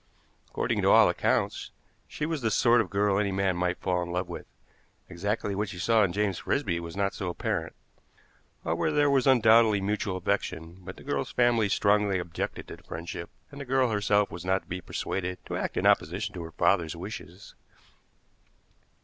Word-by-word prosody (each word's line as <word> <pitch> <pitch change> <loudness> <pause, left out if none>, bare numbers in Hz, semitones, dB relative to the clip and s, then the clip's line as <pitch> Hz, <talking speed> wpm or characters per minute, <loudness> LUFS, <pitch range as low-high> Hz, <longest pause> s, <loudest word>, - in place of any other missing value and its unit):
According - - -1
to - - +3
all - - +7
accounts, - - 0 0.4
she 150 - -4
was 160 -2 -2
the 115 - +1
sort 120 +3 +4
of 100 - -5
girl 100 0 +1
any 100 -1 0
man 95 -1 0
might 90 0 -1
fall 90 -2 -1
in 85 0 -4
love 90 +1 -2
with; 85 - -8 0.6
exactly 100 +3 -2
what 105 +1 -2
she 90 - -8
saw 110 +4 +3
in 95 - +1
James 100 -1 -1
Frisby 100 -12 -1
was 85 +2 -8
not 100 -1 0
so 95 - -4
apparent. 85 - -3 0.9
However, 85 - 0
there 145 -1 +3
was 135 -2 +2
undoubtedly 115 -4 +5
mutual 100 -1 -2
affection; 85 -3 -3
but 95 +1 -10
the - - -13
girl's - - -2
family 120 -4 +2
strongly 100 -1 +2
objected 85 -2 -5
to - - -8
the - - -21
friendship, 85 +1 -7 0.2
and 140 0 -9
the - - -3
girl 130 -2 +1
herself 105 -1 +2
was 85 - -7
not 95 +1 0
to - - -30
be 90 +1 -5
persuaded 90 +1 -3
to - - -5
act - - -3
in - - 0
opposition 90 +7 +2
to 90 - -6
her 85 0 -8
father's 80 +1 +1
wishes. 95 0 -9
100 Hz, 190 wpm, -28 LUFS, 90-110 Hz, 0.9 s, all